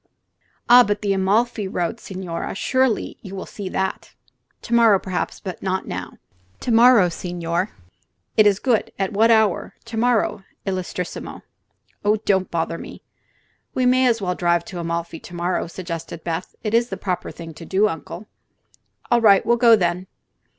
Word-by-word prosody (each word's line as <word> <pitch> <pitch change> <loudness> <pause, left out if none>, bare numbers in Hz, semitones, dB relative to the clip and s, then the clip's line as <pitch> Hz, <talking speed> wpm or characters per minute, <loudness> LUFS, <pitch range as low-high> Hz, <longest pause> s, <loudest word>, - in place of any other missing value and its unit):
"Ah, 245 +1 +9
but 205 0 -2
the 200 -1 +2
Amalfi 205 +2 +1
road, 175 -2 -2
signore! 185 -3 -5
Surely 260 +2 0
you 195 -2 -9
will 190 - -5
see 200 -3 -7
that." 190 0 -3 0.5
"To 235 - -4
morrow, 230 -4 +6
perhaps; 185 -1 -4 0.2
not 190 0 -2
now." 90 0 -5 0.5
"To 245 - -2
morrow, 230 -4 +6
signore! 175 +1 -3 0.7
It 215 -1 +6
is 200 -2 +3
good. 230 +1 0
At 195 +1 -2
what 220 +3 +4
hour, 220 -5 +2
to 230 -1 -6
morrow, 230 -4 +1 0.2
illustrissimo?" 185 -2 -4 0.6
"Oh, 210 +1 +3
don't 190 -2 +2
bother 165 0 -2
me." - - -10 0.7
"We 255 - +1
may 255 +1 +4
as 230 -4 +1
well 180 -1 0
drive 175 -1 +1
to 180 - -7
Amalfi 170 -1 -3
to 175 - -11
morrow," 175 +1 -1
suggested 170 -2 -7
Beth. 170 +1 -4
"It 215 -1 -2
is 235 +1 +3
the 195 - -4
proper 185 -2 -3
thing 165 -1 -9
to 165 - -11
do, 195 +5 +2
Uncle." 170 +2 -6 0.9
"All 240 0 +4
right; 200 -3 +5
we'll 235 - +4
go, 230 -1 +7
then." 180 -1 -1
195 Hz, 165 wpm, -22 LUFS, 175-225 Hz, 0.9 s, Ah